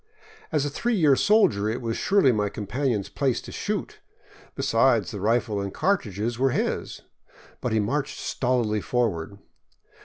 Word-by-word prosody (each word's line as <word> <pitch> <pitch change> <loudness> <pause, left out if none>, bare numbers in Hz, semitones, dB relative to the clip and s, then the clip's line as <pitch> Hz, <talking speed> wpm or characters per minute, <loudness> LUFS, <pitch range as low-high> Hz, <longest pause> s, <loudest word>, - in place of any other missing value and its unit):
As 150 -2 +1
a 145 - -2
three 235 +10 -1
year 155 -8 +4
soldier 120 - +3
it 115 +3 -2
was 115 -2 -3
surely 195 -9 +3
my 105 -3 0
companion's 110 +1 -2
place 135 -4 0
to - - -10
shoot; - - -4 0.6
besides, 115 -5 +2
the 100 - -6
rifle 110 -1 +1
and 100 0 -4
cartridges 115 - -1
were 135 +1 +3
his. - - -2 0.6
But 125 - -2
he 110 - +2
marched 140 +7 -1
stolidly 120 -5 0
forward. 100 -7 -1
120 Hz, 150 wpm, -25 LUFS, 105-135 Hz, 0.6 s, year